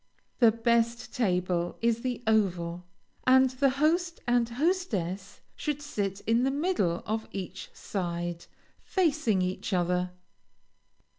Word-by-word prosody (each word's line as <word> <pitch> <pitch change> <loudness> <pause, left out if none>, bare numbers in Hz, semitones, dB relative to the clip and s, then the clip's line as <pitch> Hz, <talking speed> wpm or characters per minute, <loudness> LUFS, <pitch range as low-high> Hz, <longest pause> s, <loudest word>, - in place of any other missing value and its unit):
The 235 -3 +7
best 235 +1 +1
table 180 -7 0
is 230 0 +1
the 250 -1 -3
oval, 180 -5 0 0.4
and 260 0 +6
the 270 +2 +2
host 330 +6 +1
and 240 -1 +2
hostess 235 - -1
should 295 -2 -2
sit 205 -9 -3
in 230 +2 +2
the 265 - +2
middle 275 - 0
of 220 +1 -2
each 190 -1 -6
side, 175 -2 -4 0.3
facing 305 - +1
each 185 +3 -3
other. 180 0 +1
225 Hz, 120 wpm, -28 LUFS, 180-265 Hz, 0.4 s, The